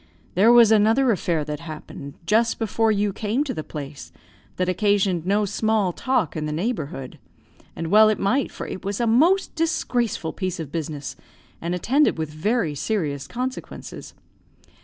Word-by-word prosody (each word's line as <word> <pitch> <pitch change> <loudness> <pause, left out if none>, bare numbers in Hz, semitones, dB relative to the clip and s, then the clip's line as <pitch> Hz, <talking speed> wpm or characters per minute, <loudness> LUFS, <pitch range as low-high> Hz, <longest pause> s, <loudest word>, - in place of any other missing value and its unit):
"There 205 +6 +5
was 235 -2 +7
another 225 +4 +4
affair 170 -6 0
that 150 0 -4
happened, 155 -3 -9
just 225 +5 +2
before 225 0 +1
you 205 -1 0
came 220 +7 -1
to 290 - -4
the 155 - -5
place, 145 -2 -8 0.4
that 185 - -1
occasioned 190 -2 +1
no 205 +2 +2
small 215 -2 0
talk 255 - 0
in 155 -1 -2
the - - -3
neighbourhood; 150 - -4 0.6
and 165 0 -4
well 215 +1 +7
it 215 - +1
might, 250 +8 0
for - - -7
it - - -7
was 200 0 -3
a 240 - +1
most 320 +13 +3
disgraceful 245 - -1
piece 185 -3 -3
of 155 -4 -6
business, 150 -3 -4 0.5
and 170 +2 -2
attended 265 - +2
with 160 -1 -3
very 185 +1 0
serious 145 -4 -2
consequences. 255 +2 -6
200 Hz, 160 wpm, -23 LUFS, 160-230 Hz, 0.6 s, was